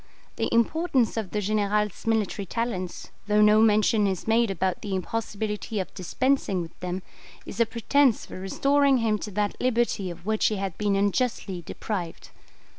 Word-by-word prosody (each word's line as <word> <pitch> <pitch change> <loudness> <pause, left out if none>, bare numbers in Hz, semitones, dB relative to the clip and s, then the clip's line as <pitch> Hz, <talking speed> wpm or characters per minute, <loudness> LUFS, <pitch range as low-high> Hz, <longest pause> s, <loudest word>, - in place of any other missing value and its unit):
The - - -1
importance 255 +1 +2
of 220 -5 -3
the 210 - -2
General's 210 0 0
military 215 -3 0
talents, 195 -5 -4 0.2
though 210 0 +4
no 210 +1 +6
mention 215 -1 +4
is 190 0 -3
made 230 0 +3
about 190 -1 -1
the 200 -2 -3
impossibility 210 +2 -3
of 185 - -4
dispensing 205 +2 0
with 165 -1 -7
them, 180 +1 -4 0.4
is 210 - -8
a 230 - +4
pretence 240 +3 +2
for - - -9
restoring 275 +8 +2
him 220 -3 +1
to 210 - -5
that 205 +1 -1
liberty 235 -6 +1
of 175 0 -10
which 215 0 +2
he 215 - 0
had 195 -3 -3
been 205 -1 +1
unjustly 200 -2 0
deprived. 175 0 -5
210 Hz, 165 wpm, -26 LUFS, 195-230 Hz, 0.4 s, no